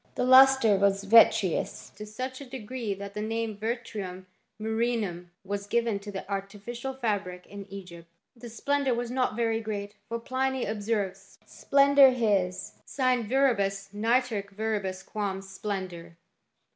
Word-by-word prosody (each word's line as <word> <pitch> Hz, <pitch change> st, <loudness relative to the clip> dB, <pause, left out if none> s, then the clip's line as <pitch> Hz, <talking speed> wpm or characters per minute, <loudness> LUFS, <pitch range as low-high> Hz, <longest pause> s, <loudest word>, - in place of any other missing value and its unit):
The -, -, 0 dB
lustre 260 Hz, -4 st, +7 dB
was 195 Hz, 0 st, +2 dB
vitreous 220 Hz, -3 st, +4 dB
to 210 Hz, 0 st, -10 dB
such 255 Hz, +5 st, -6 dB
a -, -, -7 dB
degree 245 Hz, -4 st, -5 dB
that 200 Hz, 0 st, -8 dB
the 210 Hz, -, -4 dB
name 225 Hz, 0 st, -2 dB
vitrum 210 Hz, -4 st, -5 dB, 0.3 s
miiTrhinum 220 Hz, -5 st, -1 dB, 0.2 s
was 200 Hz, +1 st, -4 dB
given 230 Hz, -2 st, 0 dB
to 205 Hz, +1 st, -8 dB
the 190 Hz, -1 st, -6 dB
artificial 205 Hz, +6 st, -5 dB
fabric, 200 Hz, -7 st, -3 dB
in 200 Hz, 0 st, -10 dB
Egypt. 175 Hz, -4 st, -10 dB, 0.3 s
The 240 Hz, 0 st, -10 dB
splendour 275 Hz, +2 st, 0 dB
was 240 Hz, 0 st, -3 dB
not 255 Hz, -3 st, 0 dB
very 225 Hz, -1 st, 0 dB
great, 205 Hz, -2 st, -5 dB, 0.2 s
for 230 Hz, -, -2 dB
Pliny 260 Hz, +2 st, -1 dB
ob 210 Hz, 0 st, -3 dB
serves, 195 Hz, -3 st, -3 dB
" -, -, -31 dB
Splendor 280 Hz, -1 st, +5 dB
his 195 Hz, -6 st, 0 dB
sine 255 Hz, -5 st, 0 dB
viribus 200 Hz, -7 st, +1 dB
nitorque 225 Hz, -1 st, 0 dB
verius 200 Hz, -3 st, -2 dB
quam 200 Hz, -2 st, -3 dB
splendor." 190 Hz, -4 st, -6 dB
215 Hz, 145 wpm, -28 LUFS, 195-240 Hz, 0.3 s, lustre